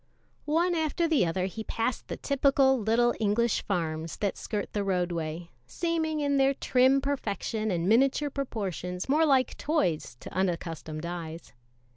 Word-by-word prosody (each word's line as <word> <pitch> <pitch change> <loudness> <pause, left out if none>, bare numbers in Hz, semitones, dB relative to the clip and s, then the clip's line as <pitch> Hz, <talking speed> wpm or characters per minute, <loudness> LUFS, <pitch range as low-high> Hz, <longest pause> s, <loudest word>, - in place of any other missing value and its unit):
One 340 +4 +2
after 330 +1 0
the 300 - +3
other 180 +3 -1
he 220 +4 -5
passed 230 +2 -2
the - - -5
typical 275 -1 +3
little 230 +3 +2
English 225 +2 +1
farms 165 -4 -3
that 200 -2 -1
skirt 210 -1 -4
the 205 - 0
roadway, 175 -3 -2 0.2
seeming 320 - -1
in 285 -1 +1
their 270 0 +3
trim 260 +1 +3
perfection 220 -5 -2
and 175 -2 0
miniature 270 +6 +3
proportions 190 - -4
more 310 +4 +3
like 265 -3 +3
toys 180 - 0
to - - -9
unaccustomed 165 -4 -2
eyes. 170 -1 -6
220 Hz, 145 wpm, -28 LUFS, 175-275 Hz, 0.2 s, the